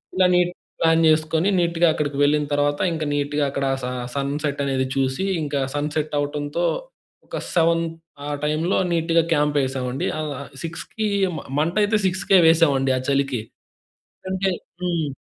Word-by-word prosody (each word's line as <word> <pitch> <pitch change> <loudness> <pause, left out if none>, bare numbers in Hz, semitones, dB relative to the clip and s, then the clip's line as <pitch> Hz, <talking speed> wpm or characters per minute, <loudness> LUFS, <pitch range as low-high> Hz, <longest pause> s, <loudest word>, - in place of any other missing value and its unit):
ఇలా 185 -1 +4
neat 180 0 +3 0.3
plan 165 0 +4
చేసుకొని 155 +4 +2
నీట్‌గా 170 0 +2
అక్కడికి 145 -2 -2
వెళ్ళిన 150 0 +3
తర్వాత 145 0 +1
ఇంకా 155 -1 -2
నీట్‌గా 145 0 0
అక్కడ 140 0 -2 0.2
స - - -1 0.3
సన్‌సెట్ 140 +1 -2
అనేది 135 -1 0
చూసి. 135 +6 0 0.2
ఇంకా 145 -1 -2 0.2
సన్‌సెట్ 150 +1 -2
అవ్వటంతో 145 +3 -1 0.6
ఒక - - -5 0.2
7 165 0 +3 0.4
ఆ - - -4 0.2
టైమ్‌లో 155 +4 +1
నీట్‌గా 165 0 +2
క్యాంప్ 150 -1 +1
ఎసామండి. 130 0 -3
ఆ! - - -1 0.4
6కి 190 +6 -4 0.5
మంట 165 +4 0
అయితే 215 +1 +2
6కే 185 0 +3
వేసామండి 140 -5 +4
ఆ - - -1
చలికి. 135 -4 +1 0.9
అంటే 190 +1 0 0.3
హ్మ్. 165 -5 -1
150 Hz, 140 wpm, -22 LUFS, 145-170 Hz, 0.9 s, ఇలా